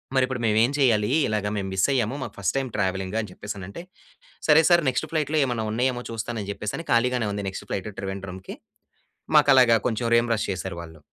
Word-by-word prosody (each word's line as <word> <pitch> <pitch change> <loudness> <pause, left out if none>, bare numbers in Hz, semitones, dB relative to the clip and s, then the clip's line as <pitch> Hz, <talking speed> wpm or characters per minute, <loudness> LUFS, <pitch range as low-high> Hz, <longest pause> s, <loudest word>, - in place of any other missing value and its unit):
మరిప్పుడు 130 -1 +1
మేము 110 -1 +2
ఏం 120 - +2
చెయ్యాలి? 110 -6 +3 0.2
ఇలాగ 105 -1 -1
మేము 95 -1 -3
మిస్ 95 - +2
అయ్యాము. 125 -1 0
మాకు - - -7
ఫస్ట్ 100 +2 -1
టైమ్ 135 -1 -2
ట్రావెలింగ్ 95 0 -2
అని 105 - -7
చెప్పేసనంటే. 100 - -8 0.6
"సరే 155 +1 +7
సార్ 175 -1 +5
నెక్స్ట్ 140 +5 -2
ఫ్లయిట్‌లో 155 -1 0
ఏమైనా 120 -4 -2
ఉన్నాయేమో 125 +2 0
చూస్తాను". 115 +1 -4
అని 100 - -8
చెప్పేసని 105 +11 -5
ఖాళీగానే 120 -1 +2
ఉంది 100 0 -4
నెక్స్ట్ 95 - -8
ఫ్లయిట్‌ 100 +2 -3
ట్రివేండ్రంకి, 95 -1 -6 0.8
మాకు 145 -1 +5
అలాగా 120 -3 +6
కొంచెం 115 0 -1
రీయింబర్స్ 115 -2 +1
చేసారు 90 -2 -5
వాళ్ళు. 80 -2 -12
115 Hz, 185 wpm, -24 LUFS, 100-130 Hz, 0.8 s, సరే